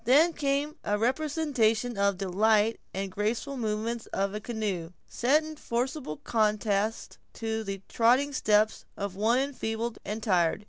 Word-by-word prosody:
Then 305 Hz, +8 st, +5 dB
came 285 Hz, +1 st, -1 dB
a 205 Hz, -, 0 dB
representation 250 Hz, -3 st, +1 dB
of 200 Hz, -1 st, +2 dB
the 195 Hz, 0 st, -3 dB
light 215 Hz, +3 st, +3 dB
and 195 Hz, 0 st, -4 dB
graceful 225 Hz, +8 st, -2 dB
movements 225 Hz, 0 st, -2 dB
of 195 Hz, 0 st, -1 dB
a 210 Hz, -, -3 dB
canoe, 205 Hz, -7 st, -3 dB
set 285 Hz, +6 st, +2 dB
in 310 Hz, 0 st, -8 dB
forcible 245 Hz, -, -2 dB
contrast 215 Hz, -1 st, 0 dB
to 225 Hz, -1 st, -3 dB
the 195 Hz, -2 st, -5 dB
tottering 255 Hz, +5 st, +3 dB
steps 215 Hz, -3 st, +2 dB
of 200 Hz, -2 st, -4 dB
one 220 Hz, +5 st, +2 dB
enfeebled 235 Hz, -4 st, -2 dB
and 215 Hz, +2 st, -4 dB
tired. 175 Hz, -6 st, +2 dB
220 Hz, 145 wpm, -28 LUFS, 205-255 Hz, -, Then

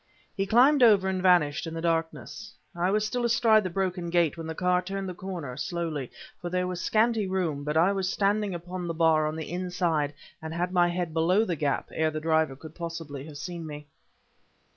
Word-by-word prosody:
He 195 Hz, -1 st, -1 dB
climbed 260 Hz, +6 st, +5 dB
over 205 Hz, -5 st, +6 dB
and 190 Hz, -1 st, -1 dB
vanished 170 Hz, -5 st, +3 dB
in 165 Hz, -, -6 dB
the -, -, -3 dB
darkness. 165 Hz, +6 st, -3 dB, 0.2 s
I 175 Hz, +2 st, +1 dB
was 210 Hz, +2 st, +1 dB
still 245 Hz, +3 st, -2 dB
astride 230 Hz, -2 st, +4 dB
the 185 Hz, -, -2 dB
broken 180 Hz, -1 st, -2 dB
gate 170 Hz, -2 st, +2 dB
when 165 Hz, -1 st, -7 dB
the 160 Hz, -, -5 dB
car 180 Hz, 0 st, +2 dB
turned 195 Hz, +1 st, -4 dB
the 185 Hz, -, -4 dB
corner, 175 Hz, -8 st, -6 dB
slowly, 160 Hz, -4 st, -3 dB, 0.3 s
for 175 Hz, -, -5 dB
there 180 Hz, +1 st, 0 dB
was 180 Hz, -1 st, -4 dB
scanty 220 Hz, -2 st, +2 dB
room; 175 Hz, -7 st, -1 dB
but 150 Hz, +2 st, -1 dB
I 175 Hz, +4 st, +4 dB
was 190 Hz, -2 st, -1 dB
standing 205 Hz, -1 st, 0 dB
upon 175 Hz, +1 st, -6 dB
the 165 Hz, -, -3 dB
bar 160 Hz, -2 st, +3 dB
on 155 Hz, -, -3 dB
the 160 Hz, 0 st, -6 dB
inside 175 Hz, -5 st, -1 dB, 0.3 s
and 160 Hz, +1 st, -6 dB
had 175 Hz, +1 st, -1 dB
my 175 Hz, -1 st, +4 dB
head 175 Hz, -2 st, -2 dB
below 180 Hz, +7 st, +3 dB
the 175 Hz, -, -1 dB
gap 145 Hz, -2 st, -1 dB
ere 160 Hz, 0 st, +1 dB
the 155 Hz, 0 st, -4 dB
driver 160 Hz, -3 st, +1 dB
could 155 Hz, +3 st, -12 dB
possibly 165 Hz, -5 st, -6 dB
have 150 Hz, -2 st, -9 dB
seen 170 Hz, +1 st, -6 dB
me. 150 Hz, -1 st, -8 dB
175 Hz, 210 wpm, -27 LUFS, 160-190 Hz, 0.3 s, over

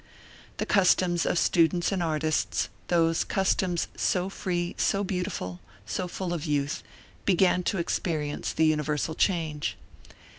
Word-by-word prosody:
The -, -, -1 dB
customs 180 Hz, -3 st, +3 dB
of -, -, +1 dB
students 170 Hz, +1 st, +3 dB
and 190 Hz, -2 st, 0 dB
artists, 155 Hz, -1 st, 0 dB, 0.2 s
those 165 Hz, -1 st, +2 dB
customs 190 Hz, -3 st, 0 dB
so 185 Hz, 0 st, 0 dB
free, 175 Hz, -3 st, -2 dB
so 200 Hz, 0 st, +2 dB
beautiful, 180 Hz, -, -3 dB, 0.3 s
so 180 Hz, -, -2 dB
full 180 Hz, 0 st, -4 dB
of 165 Hz, -4 st, -3 dB
youth, 145 Hz, -2 st, -1 dB, 0.4 s
began 185 Hz, -1 st, +3 dB
to 195 Hz, -, 0 dB
experience 155 Hz, -3 st, -2 dB
the 160 Hz, -, +2 dB
universal 150 Hz, 0 st, 0 dB
change. 160 Hz, -4 st, 0 dB
175 Hz, 125 wpm, -27 LUFS, 155-185 Hz, 0.4 s, customs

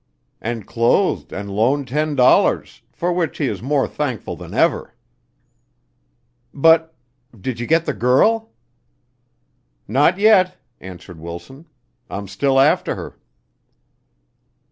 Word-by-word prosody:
"And 115 Hz, -2 st, -4 dB
clothed 120 Hz, +12 st, +1 dB
and 100 Hz, 0 st, -6 dB
loaned 130 Hz, +6 st, +1 dB
ten 150 Hz, +2 st, -1 dB
dollars, 125 Hz, -2 st, +3 dB
for 175 Hz, +1 st, -2 dB
which 175 Hz, -3 st, -2 dB
he 150 Hz, -, -1 dB
is -, -, -4 dB
more 135 Hz, +2 st, 0 dB
thankful 130 Hz, -8 st, -4 dB
than -, -, -11 dB
ever." -, -, 0 dB, 1.6 s
"But 160 Hz, +2 st, +3 dB, 0.4 s
did 120 Hz, +4 st, -4 dB
you 120 Hz, -, -4 dB
get 165 Hz, +1 st, +2 dB
the -, -, -1 dB
girl?" 215 Hz, -, +2 dB, 1.4 s
"Not 135 Hz, -, +3 dB
yet," 195 Hz, -3 st, +4 dB, 0.2 s
answered 90 Hz, -2 st, -11 dB
Wilson. 85 Hz, -, -10 dB, 0.4 s
"I'm 100 Hz, 0 st, -6 dB
still 135 Hz, +8 st, +1 dB
after 140 Hz, +3 st, +2 dB
her." -, -, -8 dB
135 Hz, 115 wpm, -20 LUFS, 115-160 Hz, 1.6 s, yet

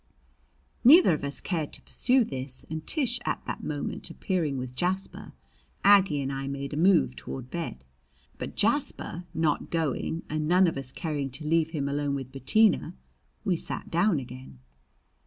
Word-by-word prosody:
Neither 285 Hz, -, +8 dB
of 150 Hz, -, -3 dB
us 140 Hz, 0 st, -3 dB
cared 160 Hz, -6 st, -2 dB
to -, -, -6 dB
pursue 255 Hz, 0 st, +2 dB
this, 130 Hz, -, -5 dB
and 160 Hz, 0 st, -5 dB
Tish 255 Hz, -6 st, +1 dB
at -, -, -3 dB
that -, -, -5 dB
moment 145 Hz, -2 st, -3 dB
appearing 165 Hz, -8 st, -1 dB
with 125 Hz, -1 st, -5 dB
Jasper, 185 Hz, +6 st, -2 dB, 0.5 s
Aggie 195 Hz, -7 st, +5 dB
and 135 Hz, +1 st, -3 dB
I 135 Hz, 0 st, -4 dB
made 140 Hz, +1 st, -4 dB
a -, -, -2 dB
move 155 Hz, -, +4 dB
toward 65 Hz, -, -7 dB
bed. 165 Hz, -, -5 dB, 0.6 s
But -, -, -5 dB
Jasper 175 Hz, +2 st, 0 dB
not 160 Hz, -2 st, 0 dB
going, 165 Hz, 0 st, -1 dB
and 155 Hz, 0 st, -2 dB
none 180 Hz, +3 st, +5 dB
of 165 Hz, -, 0 dB
us 135 Hz, -2 st, -5 dB
caring 145 Hz, -2 st, -3 dB
to 140 Hz, +4 st, -8 dB
leave 160 Hz, +1 st, +2 dB
him 150 Hz, -4 st, -2 dB
alone 140 Hz, 0 st, -1 dB
with 135 Hz, -2 st, -6 dB
Bettina, 155 Hz, -, +2 dB, 0.5 s
we 185 Hz, -, +2 dB
sat -, -, -4 dB
down 175 Hz, +1 st, +3 dB
again. 125 Hz, -, -10 dB
155 Hz, 165 wpm, -28 LUFS, 135-175 Hz, 0.6 s, Neither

